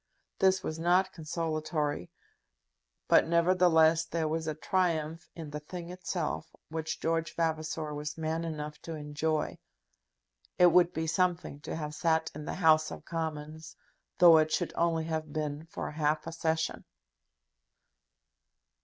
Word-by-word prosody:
This 190 Hz, -1 st, +3 dB
was 160 Hz, 0 st, -4 dB
not 180 Hz, +3 st, +3 dB
consolatory. 155 Hz, -, -2 dB, 1.0 s
But, -, -, +5 dB
nevertheless, 170 Hz, -1 st, +4 dB
there 165 Hz, -1 st, -2 dB
was 160 Hz, +1 st, -2 dB
a 155 Hz, -, -2 dB
triumph 165 Hz, -2 st, -1 dB
in 160 Hz, -3 st, -7 dB
the 150 Hz, -, -4 dB
thing 170 Hz, +3 st, -8 dB
itself 175 Hz, -3 st, -4 dB
which 160 Hz, 0 st, -3 dB
George 165 Hz, 0 st, -1 dB
Vavasor 160 Hz, -1 st, -1 dB
was 150 Hz, +1 st, -5 dB
man 160 Hz, +1 st, -2 dB
enough 150 Hz, -2 st, -5 dB
to 165 Hz, -, -6 dB
enjoy. 150 Hz, +1 st, -2 dB, 1.0 s
It 180 Hz, -1 st, +7 dB
would 175 Hz, 0 st, +5 dB
be 160 Hz, -, -2 dB
something 175 Hz, -3 st, 0 dB
to -, -, -5 dB
have 150 Hz, -2 st, -4 dB
sat 160 Hz, +1 st, +1 dB
in 150 Hz, 0 st, -7 dB
the -, -, -4 dB
House 155 Hz, -3 st, +4 dB
of -, -, -9 dB
Commons, 160 Hz, -1 st, -5 dB, 0.4 s
though 170 Hz, -3 st, +8 dB
it 155 Hz, 0 st, +1 dB
should 175 Hz, -, -1 dB
only 165 Hz, -1 st, +1 dB
have 160 Hz, -1 st, -3 dB
been 150 Hz, +1 st, -3 dB
for 165 Hz, -, -5 dB
half 150 Hz, 0 st, 0 dB
a 165 Hz, -, -5 dB
session. 160 Hz, -1 st, -1 dB
160 Hz, 140 wpm, -30 LUFS, 155-170 Hz, 1.0 s, though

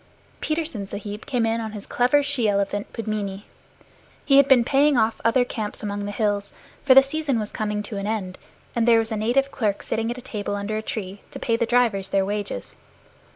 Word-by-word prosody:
Petersen 310 Hz, -10 st, -2 dB
Sahib 205 Hz, +1 st, -7 dB
came 245 Hz, -5 st, +1 dB
in 225 Hz, +1 st, 0 dB
on 220 Hz, -1 st, -5 dB
his 210 Hz, -1 st, -7 dB
clever 255 Hz, +4 st, +2 dB
she 270 Hz, -6 st, +1 dB
elephant 200 Hz, 0 st, -1 dB
Pudmini; 210 Hz, -3 st, -4 dB, 0.8 s
he 275 Hz, -1 st, +5 dB
had 280 Hz, -1 st, +7 dB
been 260 Hz, -4 st, +6 dB
paying 280 Hz, +2 st, +3 dB
off 220 Hz, 0 st, +1 dB
other 245 Hz, +2 st, +3 dB
camps 215 Hz, -4 st, -5 dB
among 205 Hz, -1 st, -3 dB
the 205 Hz, -, -3 dB
hills, 205 Hz, -1 st, -1 dB, 0.3 s
for 260 Hz, -2 st, +6 dB
the 270 Hz, -, +10 dB
season 280 Hz, -2 st, -1 dB
was 215 Hz, -1 st, -3 dB
coming 210 Hz, -1 st, -2 dB
to 210 Hz, 0 st, -6 dB
an 200 Hz, +1 st, -3 dB
end, 200 Hz, -4 st, -3 dB, 0.4 s
and 235 Hz, 0 st, +1 dB
there 230 Hz, -1 st, +7 dB
was 225 Hz, 0 st, 0 dB
a -, -, 0 dB
native 245 Hz, +6 st, +1 dB
clerk 210 Hz, -5 st, -1 dB
sitting 225 Hz, +1 st, -1 dB
at 240 Hz, -, -4 dB
a -, -, -7 dB
table 205 Hz, -4 st, -4 dB
under 205 Hz, +1 st, -3 dB
a 215 Hz, -, -1 dB
tree, 200 Hz, -3 st, -5 dB
to -, -, -8 dB
pay 230 Hz, -, 0 dB
the 235 Hz, 0 st, 0 dB
drivers 230 Hz, -6 st, +2 dB
their 195 Hz, -1 st, +2 dB
wages. 205 Hz, -, -4 dB
220 Hz, 210 wpm, -24 LUFS, 205-245 Hz, 0.8 s, the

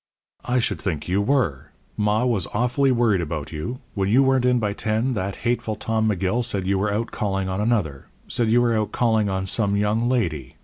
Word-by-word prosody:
"I 125 Hz, +1 st, +1 dB
should 120 Hz, -, -1 dB
think 80 Hz, -7 st, -3 dB
you 95 Hz, +3 st, +1 dB
were! 85 Hz, -, 0 dB, 0.2 s
Ma 105 Hz, +3 st, +1 dB
was 110 Hz, -9 st, 0 dB
awfully 125 Hz, +4 st, +2 dB
worried 115 Hz, -6 st, +2 dB
about 75 Hz, -3 st, -4 dB
you. 115 Hz, -, -5 dB
When 95 Hz, -1 st, -1 dB
you 125 Hz, +6 st, +5 dB
weren't 130 Hz, -1 st, +2 dB
in 125 Hz, 0 st, +3 dB
by 105 Hz, -3 st, -1 dB
ten, 110 Hz, +5 st, -1 dB
that 100 Hz, -2 st, -3 dB
hateful 120 Hz, -2 st, 0 dB
Tom 110 Hz, 0 st, 0 dB
McGill 100 Hz, +4 st, 0 dB
said 100 Hz, -5 st, -1 dB
you 95 Hz, 0 st, +1 dB
were 105 Hz, +1 st, 0 dB
out 110 Hz, +3 st, -2 dB
calling 95 Hz, -3 st, -2 dB
on 95 Hz, +2 st, -2 dB
another 100 Hz, -, -1 dB, 0.2 s
said 115 Hz, -2 st, 0 dB
you 120 Hz, +2 st, +4 dB
were 120 Hz, -1 st, +2 dB
out 110 Hz, -1 st, -1 dB
calling 110 Hz, -4 st, +1 dB
on 95 Hz, 0 st, -2 dB
some 100 Hz, +1 st, 0 dB
young 105 Hz, +4 st, +1 dB
lady. 80 Hz, -, -1 dB
105 Hz, 210 wpm, -23 LUFS, 95-120 Hz, 0.2 s, you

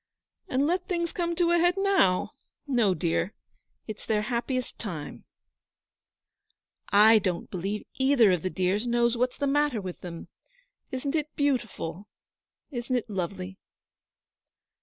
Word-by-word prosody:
'And 265 Hz, +2 st, +1 dB
let 355 Hz, +3 st, 0 dB
things 340 Hz, -2 st, -1 dB
come 345 Hz, -4 st, -1 dB
to 345 Hz, 0 st, +2 dB
a 345 Hz, -, +4 dB
head 350 Hz, +1 st, +3 dB
now? 390 Hz, -, +3 dB, 0.3 s
No, 235 Hz, -9 st, +2 dB
dear; 170 Hz, +3 st, -1 dB, 0.5 s
it's 215 Hz, -1 st, -7 dB
their 210 Hz, -1 st, 0 dB
happiest 245 Hz, +3 st, -2 dB
time.' 170 Hz, -9 st, -6 dB, 1.7 s
'I 215 Hz, +2 st, +7 dB
don't 180 Hz, -4 st, -3 dB
believe 195 Hz, +4 st, -3 dB
either 265 Hz, -6 st, +5 dB
of 180 Hz, -3 st, +1 dB
the 185 Hz, -, -1 dB
dears 190 Hz, +6 st, 0 dB
know 240 Hz, 0 st, +3 dB
what's 245 Hz, +1 st, -1 dB
the 285 Hz, -, -1 dB
matter 290 Hz, -3 st, +2 dB
with 185 Hz, -3 st, -7 dB
them. 170 Hz, -2 st, -8 dB, 0.6 s
Isn't 265 Hz, +2 st, -3 dB
it 305 Hz, -1 st, -2 dB
beautiful? 225 Hz, -, -1 dB, 0.6 s
Isn't 245 Hz, -1 st, -2 dB
it 235 Hz, -3 st, -2 dB
lovely?' 190 Hz, 0 st, -4 dB
235 Hz, 135 wpm, -27 LUFS, 190-285 Hz, 1.7 s, I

